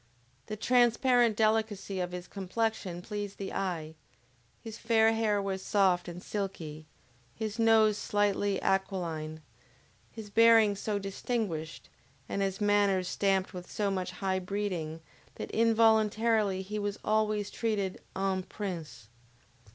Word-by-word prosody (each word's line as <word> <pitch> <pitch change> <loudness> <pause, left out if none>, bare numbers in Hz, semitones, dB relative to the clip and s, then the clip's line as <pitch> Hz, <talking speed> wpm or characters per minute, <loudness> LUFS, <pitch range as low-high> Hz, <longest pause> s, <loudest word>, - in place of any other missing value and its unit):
The 215 - -4
transparent 245 0 +3
delicacy 215 -3 0
of 180 -1 -2
his 180 0 -6
complexion 195 -2 -3
pleased 205 -1 -5
the 195 - -5
eye, 170 -5 -3 0.7
his 225 -2 -9
fair 225 -1 +4
hair 220 -2 +1
was 195 -1 -3
soft 190 -3 +2
and 175 +1 -8
silky, 160 -7 -5 0.5
his 220 0 -4
nose 220 -2 +4
slightly 205 -1 +1
aquiline, 170 -5 -2 0.7
his 215 -2 -9
bearing 225 -2 +6
so 205 +1 -2
distinguished, 195 -5 -3 0.4
and 200 - -2
his 195 -1 -1
manners 205 -3 +2
stamped 195 -1 +1
with 180 -1 -8
so 205 -2 -1
much 185 -2 -2
high 190 +1 -2
breeding, 180 -5 -3 0.3
that - - -6
involuntarily 220 -3 +3
he 210 +2 -4
was 205 0 -2
always 215 -1 +1
treated 210 -5 -2
EN 190 -1 0
PRINCE. 165 - -6
200 Hz, 125 wpm, -30 LUFS, 185-220 Hz, 0.7 s, bearing